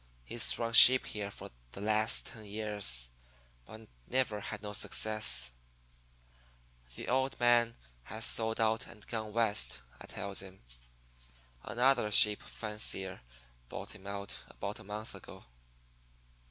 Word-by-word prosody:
He's 115 - +2
run 115 -1 -4
sheep 130 +2 +10
here 105 -2 -6
for - - -11 0.2
the - - -10
last 110 +2 +1
ten 110 - -11
years, 100 - -1 0.6
but 110 0 -13 0.2
never 125 -5 -1
had 105 +1 -8
no 105 0 -7
success.' 105 - +2 1.4
"'The - - -8
old 130 +2 -1
man 120 -1 +2 0.3
has 110 +2 -3
sold 110 0 -1
out 110 0 0
and 105 -2 -15
gone 110 -2 -6
West,' 105 - 0 0.2
I - - -12
tells 100 -1 -5
him. 95 -4 -14 1.0
'Another 120 - 0
sheep 105 0 +7
fancier 105 -3 -5 0.5
bought - - -8
him 100 -2 -14
out 100 0 -6
about - - -7
a - - -13
month 105 +2 -8
ago.' - - -13
105 Hz, 130 wpm, -31 LUFS, 100-115 Hz, 1.4 s, sheep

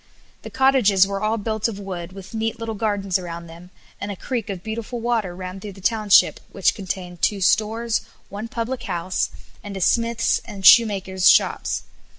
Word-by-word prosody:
The - - -8
cottages 255 -8 +4
were 195 0 -4
all 215 +1 0
built 220 0 -1
of 220 -4 -5
wood, 185 -3 -6
with 190 +1 -11
neat 225 +1 -2
little 230 -1 -4
gardens 200 -3 -1
around 170 -1 -7
them, 170 +2 -13 0.3
and 205 - -4
a - - -5
creek 235 +3 -4
of 190 -3 -5
beautiful 225 +2 -5
water 225 -6 -1
ran 185 +1 -7
through 200 0 -8
the 195 - -14
township, 210 0 +4
which 195 - +2
contained 180 -3 -6
two 205 - +2
stores, 220 +4 +1 0.3
one 205 +3 -6
public 240 +1 -4
house, 175 +1 -1 0.3
and 200 -1 -6
smith's 230 -1 +2
and 200 -4 -8
shoemaker's 190 -5 +6
shops. - - +2
205 Hz, 170 wpm, -22 LUFS, 190-225 Hz, 0.3 s, shoemaker's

